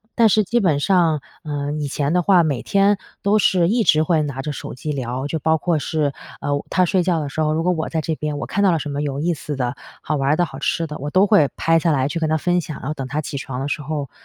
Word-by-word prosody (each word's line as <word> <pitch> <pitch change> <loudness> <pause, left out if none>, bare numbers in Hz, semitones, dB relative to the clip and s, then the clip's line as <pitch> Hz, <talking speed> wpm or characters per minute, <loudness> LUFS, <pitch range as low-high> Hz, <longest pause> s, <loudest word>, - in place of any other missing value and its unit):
但 230 -2 +5
是 215 +1 +4
基 235 +5 +1
本 165 -9 +2
上， 165 -3 +2 0.2
呃， 145 -2 -3
以 145 - -2
前 145 +2 -1
的 180 - +3
话， 180 -1 +5
每 140 -6 -1
天 200 0 +2 0.2
都 205 +2 +3
是 180 -4 +3
一 230 +3 +2
直 155 -6 +4
会 160 0 +2
拿 140 -3 -4
着 150 - -3
手 140 - -7
机 150 +4 -4
聊， 130 -1 -3
就 160 +2 -2
包 160 +2 +2
括 165 0 0
是， 145 0 -1 0.3
呃， 145 0 -1
她 185 - +3
睡 185 +1 +2
觉 175 -2 +1
的 150 - -3
时 160 - -3
候， 155 0 +2
如 160 +1 0
果 180 - +2
我 160 -3 -2
在 160 - -1
这 160 +1 -2
边， 150 -1 -3
我 145 - -4
看 200 - -1
到 195 - +5
了 165 - +2
什 150 -1 -4
么 145 0 -2
有 140 -1 -2
意 170 +3 +1
思 150 -1 -5
的， 125 -2 -2 0.3
好 155 - -1
玩 135 -1 0
儿 - - +4
的， 175 - +2
好 135 -4 -9
吃 165 +3 0
的， 150 -1 -7
我 145 - -4
都 185 +5 +4
会 190 -9 +4
拍 165 0 +3
下 165 0 +1
来 135 -3 +1
去 165 +3 -3
跟 160 - 0
她 155 - +2
分 175 +3 +1
享 155 -3 -7
然 - - -6
后 150 - -1
等 135 -3 -5
她 145 +3 -3
起 140 -2 -5
床 130 -1 -5
的 135 - -2
时 150 - -2
候， 145 -2 -4
155 Hz, 320 characters per minute, -21 LUFS, 145-175 Hz, 0.3 s, 但